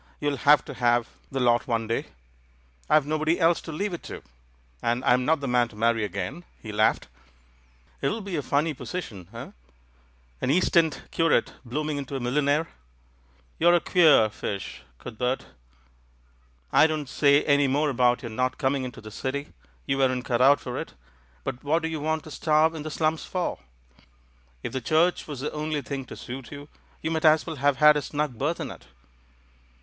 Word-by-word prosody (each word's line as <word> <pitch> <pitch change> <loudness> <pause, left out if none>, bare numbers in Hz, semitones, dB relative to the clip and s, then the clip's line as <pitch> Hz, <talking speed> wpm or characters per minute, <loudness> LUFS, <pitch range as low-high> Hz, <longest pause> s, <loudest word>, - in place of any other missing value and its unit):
You'll 145 -1 -1
have 145 +3 +5
to - - -7
have 120 -1 +1 0.2
the 135 - -2
lot 120 -2 +2
one 115 -2 0
day 115 +1 -2 0.4
— - - -34
I've 155 -2 +4
nobody 155 +3 0
else 165 0 +3
to 160 - -8
leave 195 +5 -3
it 170 - -5
to, - - -8 0.6
and 120 +2 -1
I'm 125 +1 +3
not 160 0 +2
the 140 - -3
man 125 -1 +2
to 110 - -16
marry 115 0 +1
again." 100 - -4 0.2
He 110 - -8
laughed. 105 +1 +2 0.9
"It'll 215 +11 -1
be 195 -3 -5
a 150 - 0
funny 150 +3 0
position, 115 - -7
eh - - -8 0.5
— 60 -1 -34
an - - -1
East 180 +6 +2
End 160 -3 +3
cu 165 0 +1
rate - - +2
blooming 150 +4 -3
into 140 0 -6
a - - -2
millionaire? 145 +5 +1 0.9
You're 175 +2 +5
a - - +4
queer 160 -11 +5
fish, 100 -8 -5 0.2
Cuthbert! 125 - -3 1.3
I 155 - +6
don't 155 -3 -3
say 140 +2 +3
any 145 -1 +3
more 145 +2 +1
about 125 -1 +2
your 120 - -5
not 130 +3 -1
coming 135 -1 0
into 125 -2 -7
the 110 0 -10
City 135 +6 -4
— 60 -1 -34
you 135 - -1
weren't 130 -2 +1
cut 120 0 0
out 135 +1 +6
for - - -5
it - - -7 0.2
— 60 0 -33
but 120 - -5
what 160 +3 +1
do - - 0
you 160 -1 -4
want 155 +1 -1
to 155 - -11
starve 155 +2 +2
in 160 - -6
the 155 - -5
slums 155 0 0
for? 180 -1 -3 1.0
If - - -5
the 130 - -2
Church 160 +8 +2
was 145 -4 -6
the 150 - -3
only 150 -1 -3
thing 135 0 -5
to - - -10
suit 130 0 -8
you, 145 +1 -9 0.3
you 160 - -1
might 160 0 -1
as 155 0 +5
well 160 -3 -5
have 140 0 +2
had 150 0 +7
a 150 - 0
snug 145 -5 -3
berth 155 +5 -1
in - - -4
it." - - -13
140 Hz, 200 wpm, -26 LUFS, 120-155 Hz, 1.3 s, had